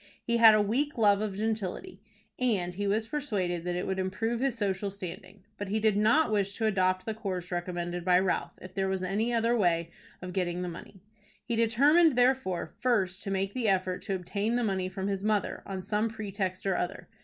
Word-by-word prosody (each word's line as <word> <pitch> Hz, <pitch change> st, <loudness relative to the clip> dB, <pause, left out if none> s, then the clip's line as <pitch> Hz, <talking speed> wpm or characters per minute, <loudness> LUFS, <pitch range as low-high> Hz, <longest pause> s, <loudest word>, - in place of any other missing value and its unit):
He 235 Hz, 0 st, +1 dB
had 225 Hz, -2 st, +8 dB
a 215 Hz, -, +4 dB
weak 265 Hz, +8 st, 0 dB
love 205 Hz, -2 st, +4 dB
of 205 Hz, -3 st, -3 dB
gentility, 220 Hz, -, -3 dB, 0.4 s
and 200 Hz, -8 st, 0 dB
he 200 Hz, +2 st, -2 dB
was 215 Hz, +2 st, 0 dB
persuaded 200 Hz, -, -2 dB
that 175 Hz, 0 st, -1 dB
it 180 Hz, -, -2 dB
would 190 Hz, 0 st, -2 dB
improve 210 Hz, +5 st, -1 dB
his 265 Hz, -2 st, 0 dB
social 200 Hz, -1 st, -1 dB
standing. 190 Hz, 0 st, -9 dB, 0.2 s
But 205 Hz, -, -3 dB
he 210 Hz, +3 st, 0 dB
did 215 Hz, -1 st, +2 dB
not 220 Hz, +7 st, +3 dB
wish 200 Hz, -1 st, 0 dB
to 225 Hz, -, 0 dB
adopt 185 Hz, -3 st, +1 dB
the 220 Hz, -, -2 dB
course 185 Hz, -5 st, -5 dB
recommended 175 Hz, 0 st, -3 dB
by 180 Hz, 0 st, +4 dB
Ralph 185 Hz, 0 st, 0 dB
if 185 Hz, 0 st, -10 dB
there 195 Hz, 0 st, 0 dB
was 190 Hz, -1 st, -1 dB
any 210 Hz, +6 st, 0 dB
other 230 Hz, 0 st, +2 dB
way 170 Hz, -5 st, +1 dB, 0.3 s
of 180 Hz, 0 st, -7 dB
getting 180 Hz, -1 st, -1 dB
the -, -, -3 dB
money. 175 Hz, +2 st, -11 dB, 0.4 s
He 235 Hz, -, -1 dB
determined, 280 Hz, +8 st, +4 dB
therefore, 245 Hz, -10 st, +1 dB
first 205 Hz, -6 st, +1 dB
to -, -, -3 dB
make 195 Hz, 0 st, -1 dB
the 245 Hz, -3 st, -1 dB
effort 185 Hz, -2 st, +1 dB
to 195 Hz, -, -2 dB
obtain 200 Hz, +5 st, -2 dB
the 245 Hz, -, +1 dB
money 190 Hz, -3 st, -1 dB
from 190 Hz, +1 st, -4 dB
his 195 Hz, -1 st, -2 dB
mother 210 Hz, -2 st, 0 dB
on 190 Hz, -1 st, -5 dB
some 210 Hz, +3 st, 0 dB
pretext 200 Hz, -4 st, -4 dB
or 195 Hz, -2 st, +1 dB
other. 180 Hz, +1 st, -3 dB
200 Hz, 210 wpm, -29 LUFS, 185-225 Hz, 0.4 s, had